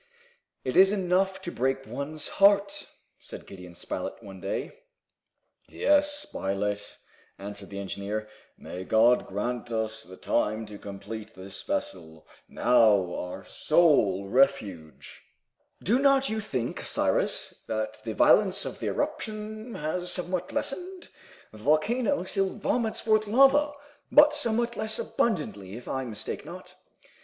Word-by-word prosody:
"It 130 - -3
is 190 +1 +7
enough 190 -1 +1
to 175 - -4
break 135 0 -1
one's 140 +5 -4
heart!" 200 0 +4 0.3
said - - -10
Gideon 90 -2 -11
Spilett, - - -5
one 95 -2 -10
day. 100 - -3 1.0
"Yes, 295 0 +3
Spilett," 100 +1 -3 0.4
answered 100 0 -8
the 100 - -7
engineer. 100 +2 -4 0.3
"May 90 +1 -7
God 115 +5 +4
grant 120 +5 -3
us 110 -1 -2
the 95 -4 -12
time 110 -1 0
to 105 -1 -10
complete 105 +2 -8
this 95 +1 -9
vessel, 80 -4 -4 0.2
now 110 -7 +4
our 90 - -6
sole 105 - +3
refuge!" 100 - 0 0.6
"Do 230 +9 +3
not 275 -1 +4
you 220 0 -1
think, 125 - -3
Cyrus, - - -1
that 110 0 -3
the 110 -2 -4
violence 200 -1 +4
of - - -6
the - - -3
eruption 215 +1 -4
has 175 +4 -2
somewhat 180 0 -2
lessened? 365 +5 -4 0.4
The 110 - -13
volcano 210 - +2
still 195 +1 +1
vomits 220 +2 -1
forth 215 -1 +2
lava, 275 +6 +5 0.4
but 295 0 +7
somewhat 235 -4 0
less 220 0 -1
abundantly, 105 - -2
if 125 - -12
I 130 -1 -2
mistake 110 -4 -5
not." - - -10
135 Hz, 130 wpm, -27 LUFS, -, 1.0 s, is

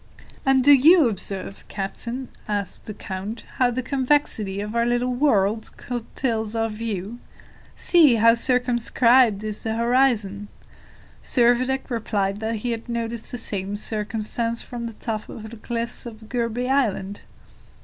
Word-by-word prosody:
"And 265 -1 +4
do 290 - +7
you 305 +2 +7
observe, 195 -2 -4
captain," 235 +6 -5 0.2
asked 205 -3 -3
the 215 - -6
count, 195 +4 -6
"how 250 -1 +4
the 250 +1 -2
convexity 255 -7 0
of 210 +2 -4
our 235 - +3
little 240 +1 +1
world 220 -5 +2
curtails 230 -2 -3
our 225 0 0
view? 215 0 -5 0.6
See, 315 -8 +5
how 230 +1 +6
circumscribed 240 -2 +3
is 215 -1 -4
the 220 0 -2
horizon!" 230 -4 +1 0.7
Servadac 255 +2 +2
replied 205 -4 -1
that 220 +1 -2
he 240 - 0
had 230 +1 -5
noticed 235 -1 -3
the 245 - -5
same 200 -3 -3
circumstance 220 +2 -3
from 235 -2 -6
the 230 - -7
top 215 -1 -5
of 220 0 -8
the 230 - -9
cliffs 235 +2 -4
of 220 -1 -11
Gourbi 240 0 -1
Island. 210 -7 0
230 Hz, 140 wpm, -23 LUFS, 215-245 Hz, 0.7 s, do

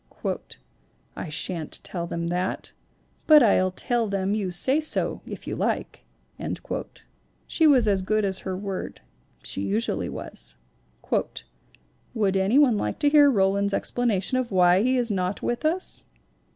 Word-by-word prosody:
" - - -39
'I 170 - -6
shan't 165 0 -3
tell 170 -2 -4
them 170 0 -3
that, 180 +2 -2 0.6
but 305 -3 +8
I'll 185 -4 +4
tell 235 +5 -1
them 195 0 -1
you 205 -3 -1
say 260 - +1
so, 310 - -1
if - - -8
you - - -4
like.' - - -2 0.6
" - - -9
She 320 - +3
was 255 -6 +5
as 195 -2 +2
good 215 +2 +1
as 190 -1 -1
her 185 -1 -4
word 195 -1 -5 0.4
she - - -4
usually 100 +3 -1
was. - - -8 0.8
[ - - -17
'Would 200 -4 +1
any 195 +6 +2
one 255 -8 +5
like 105 - -2
to 290 - +3
hear 290 -1 +6
Roland's 200 -3 +2
explana 230 -5 0
tion 255 +6 0
of 250 -2 -2
why 180 0 +5
he 255 +3 +2
is 240 -3 +2
not 185 0 -2
with 240 +4 -2
us?' 345 +4 -1
200 Hz, 160 wpm, -25 LUFS, 185-245 Hz, 0.8 s, but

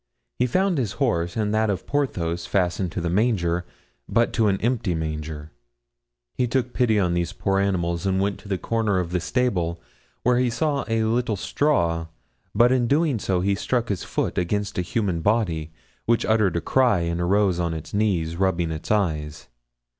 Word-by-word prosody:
He 125 - +3
found 185 +3 +1
his 110 -7 -1
horse 90 -10 0
and 105 -1 0
that 110 0 +2
of 100 - -2
Porthos 85 -12 -1
fastened 90 -1 0
to 90 - -2
the 85 - -2
manger, 90 -5 +1 0.4
but 115 0 +2
to 115 -3 +2
an 95 -1 +1
empty 115 -7 0
manger. 75 -1 -5 0.8
He 125 - 0
took 125 0 -1
pity 110 -4 +2
on 90 -3 +1
these 85 0 -1
poor 95 0 0
animals 90 -2 0
and 95 0 +1
went 100 +1 -1
to 100 - -11
a 95 - +1
corner 110 -1 0
of 90 -2 -2
the 90 - +1
stable, 90 -6 0 0.4
where 125 0 +3
he 125 -1 +2
saw 145 +3 -1
a 115 -1 +1
little 115 0 0
straw, 85 - 0 0.5
but 120 +3 +5
in 125 -2 +2
doing 145 -2 +2
so 95 -2 0
he 100 +2 +2
struck 120 +4 -1
his 100 -4 -2
foot - - -1
against 100 +2 -1
a - - +3
human 90 -2 -1
body, 85 -7 0 0.4
which 115 0 +2
uttered 110 -4 +2
a 85 - 0
cry 120 -6 +3
and 85 +1 -1
arose 95 0 +2
on 85 -2 -1
its 80 - -8
knees, 90 -6 0
rubbing 90 -3 +1
its 80 0 -6
eyes. 80 -9 -1
100 Hz, 185 wpm, -24 LUFS, 85-115 Hz, 0.8 s, but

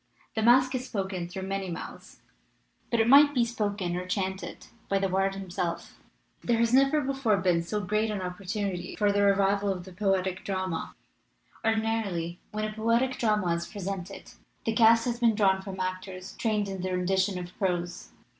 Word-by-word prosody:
The 220 - -1
masque 255 +3 +5
is 255 0 -3
spoken 190 -4 -3
through 190 +2 -6
many 195 0 -3
mouths, 170 - -8 0.7
but 235 - +1
it 225 - +3
might 285 +3 +7
be 240 -2 +3
spoken 205 -6 -2
or 180 +1 -4
chanted 190 0 -3 0.2
by 195 - +2
the 195 0 +1
bard 195 +1 0
himself. 180 -3 -4 0.4
"There 235 -1 +2
has 230 +1 +2
never 275 +3 +4
before 270 -6 +1
been 180 -3 +2
so 210 +5 -3
great 215 +3 0
an 210 -2 -2
op 180 -1 -5
310 200 - -13
MASQUE 205 +2 -2
AND - - -6
DEMOCRACY 175 -1 -6
portunity - - -20
for 205 -1 +3
the 205 0 +2
revival 200 0 +3
of 180 -2 -4
the 190 - -11
poetic 190 -1 0
drama. 185 -4 -3 0.7
Ordinarily 220 -6 -1
when 215 0 -2
a 215 - -4
poetic 235 +4 +1
drama 210 -7 +2
is 170 0 -3
presented 195 -1 -6 0.3
the 225 - +1
cast 230 0 +5
has 240 -1 -2
been 230 -3 +3
drawn 190 -2 +3
from 190 -1 -7
actors 185 0 -5
trained 210 -3 0
in 195 -2 -5
the 185 0 -2
rendition 190 +1 +1
of 180 0 -7
prose. 175 -3 -2
195 Hz, 190 wpm, -28 LUFS, 185-225 Hz, 0.7 s, might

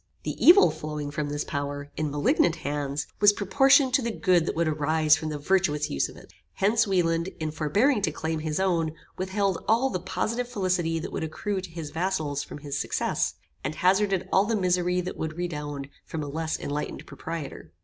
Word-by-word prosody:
The - - -2
evil 365 +4 +8
flowing 150 -1 -5
from 145 0 -3
this 145 0 -2
power, 145 0 -4
in 155 -1 -1
malignant 145 +3 +2
hands, 145 -1 -3
was 205 0 +7
proportioned 265 +6 +4
to 275 - +4
the 235 - -1
good 180 -6 +2
that - - -1
would 170 0 +1
arise 155 0 +3
from 155 - -4
the 150 - -3
virtuous 150 -2 +1
use 70 - 0
of - - -13
it. - - -15 0.2
Hence, 220 +3 +2
Wieland, 170 -3 +1
in 155 -1 -2
forbearing 205 - +2
to 160 - +1
claim 160 +1 -3
his 155 +1 -2
own, 170 -5 +1 0.2
withheld 190 -1 -1
all 240 +5 +3
the 185 - -1
positive 230 +7 -2
felicity 180 -7 0
that 165 - -5
would - - -3
accrue 190 +5 -3
to 185 - -8
his 165 -3 -7
vassals 160 -5 -1
from - - -8
his 145 -1 -4
success, - - -1 0.3
and 150 +3 -3
hazarded 190 0 +2
all 195 - +5
the 225 +1 0
misery 180 -2 +1
that 180 +1 -6
would 160 0 -4
redound 150 -5 -4 0.2
from 160 -2 -5
a - - -5
less 160 +2 -2
enlightened 145 +1 -4
proprietor. 160 - -7
165 Hz, 195 wpm, -26 LUFS, 150-190 Hz, 0.3 s, evil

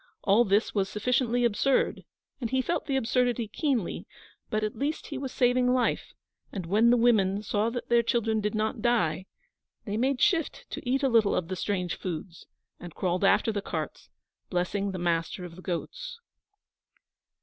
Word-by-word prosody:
All 215 +4 +4
this 205 +3 +2
was 195 -2 0
sufficiently 245 +2 +1
absurd, 240 +4 +1 0.3
and 235 -4 -3
he 260 +1 +1
felt 340 0 -2
the 275 - 0
absurdity 245 -2 +1
keenly; 245 - -2 0.4
but 215 0 -1
at 215 - -2
least 285 +7 -2
he 290 - -6
was 265 -2 -4
saving 250 0 +3
life, 245 -2 -1 0.4
and 190 -4 -5
when 215 +7 +4
the 245 - +5
women 210 -4 +3
saw 210 +1 0
that 240 +1 -5
their 235 0 +4
children 225 -2 0
did 210 +1 -1
not 220 +2 -1
die, 190 -7 +1 0.6
they 210 0 -2
made 260 +2 +1
shift 335 -4 +1
to 245 - -5
eat 270 +2 +1
a - - +4
little 225 -5 +3
of 175 -1 -2
the 185 - -2
strange 180 -2 -2
foods, 170 -1 -6 0.3
and 175 -2 -10
crawled 180 0 -1
after 210 +3 +4
the 205 -2 -2
carts, - - -5 0.4
blessing 190 +2 -1
the 190 - -4
master 175 +1 -1
of 170 -1 -10
the 185 - -11
goats. 465 - -5
220 Hz, 175 wpm, -28 LUFS, 195-250 Hz, 0.6 s, the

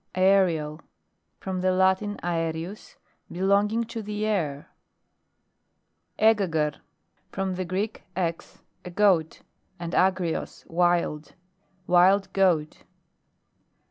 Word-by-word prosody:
AERIAL 180 -5 +2 0.6
From 190 -1 -4
the 185 0 +2
Latin 190 +2 +1
aerius: 165 +3 -4 0.4
be 175 - -7
longing 205 +4 +2
to 225 0 -6
the 210 0 -3
air. 155 -10 -2 1.5
^EGAGRE. 175 -9 +2 0.5
From 195 -1 -2
the 185 0 -3
Greek, 195 +5 -3 0.2
nix, 170 -3 -4 0.2
a 180 - -7
goat, 180 -4 +2 0.4
and 170 0 -5
agrios, 185 -3 0
wild: 170 -3 0 0.5
wild 190 +2 +4
goat. 175 -6 +1
185 Hz, 95 wpm, -26 LUFS, 165-195 Hz, 1.5 s, wild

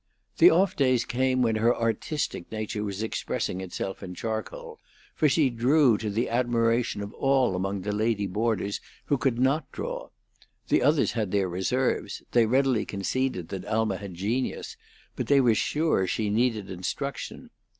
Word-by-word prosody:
The 350 - +9
off 190 - +3
days 130 -4 +2
came 130 +1 +1
when 115 -2 +1
her 115 +2 +3
artistic 115 - -2
nature 110 -1 -3
was 100 0 -3
expressing 95 -3 -2
itself 95 +1 -5
in 90 0 -7
charcoal, 110 +2 -5 0.3
for 155 - +3
she 140 -2 +3
drew 125 +2 +4
to 110 - -3
the 110 +4 0
admiration 115 -2 +1
of 100 - -8
all 135 -7 +2
among 95 +1 -2
the 105 +3 -2
lady 105 0 0
boarders 100 0 -1 0.2
who 145 - +1
could 130 -4 +1
not 135 +5 +1
draw. - - -5 0.6
The - - +3
others 150 0 +3
had 110 -4 -2
their 100 -1 +1
reserves; 100 +4 -1
they 120 -2 +4
readily 130 -1 +2
conceded 100 -2 -2
that 95 - -5
Alma 110 -3 0
had 100 -3 -8
genius, 110 +9 -2 0.4
but - - -3
they 140 -1 +5
were 120 -4 +4
sure 150 - +1
she 105 +3 -1
needed 110 -3 0
instruction. 95 +10 -5
115 Hz, 160 wpm, -27 LUFS, 100-130 Hz, 0.6 s, The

